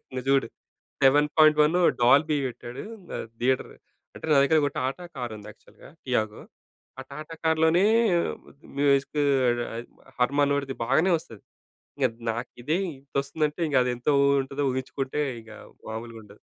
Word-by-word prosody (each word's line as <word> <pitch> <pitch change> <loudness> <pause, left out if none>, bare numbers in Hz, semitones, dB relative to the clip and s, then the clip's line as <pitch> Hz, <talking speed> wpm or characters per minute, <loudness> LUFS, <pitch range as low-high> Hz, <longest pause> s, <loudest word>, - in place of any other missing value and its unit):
నువ్వు 130 - -4
చూడు. 135 0 +3 0.6
7.1 150 +3 +5 0.3
డాల్బీ 145 +5 +4
వెట్టాడు. 125 +1 -7 0.3
ఆహ్, - - -5
థియేటర్. 130 +1 0 0.4
అంటే, - - -12
నా - - +5
దగ్గర 155 +3 +3
ఒక 145 - 0
టాటా 135 +7 -3
కారుంది 110 -4 -6
యాక్చువల్‌గా 105 - -18
టియాగో. 110 -5 -1 0.6
ఆ - - -5
టాటా 155 +3 -8
కార్‌లోనే 160 +3 +3 0.9
మ్యూజిక్కూ 140 +1 +2 0.3
అది 120 0 -1 0.6
హర్‌మానోడి‌ది 140 +1 +1
బాగానే 155 +10 +2
వస్తది. 115 -9 -13 0.6
ఇద్ 115 -2 -8
నాకిదే 120 +7 -3 0.2
ఇంతొస్తుందంటే, 140 +3 -3
ఇంక 140 - 0
అదెంత 125 +1 -3
వొ 140 - +4 0.2
ఉంటదో 140 +1 -3
ఊహించుకుంటే 135 +2 -3 0.2
ఇగ 110 - -16 0.4
మాములుగుండదు. 110 -2 -9
135 Hz, 120 wpm, -26 LUFS, 120-150 Hz, 0.9 s, 7.1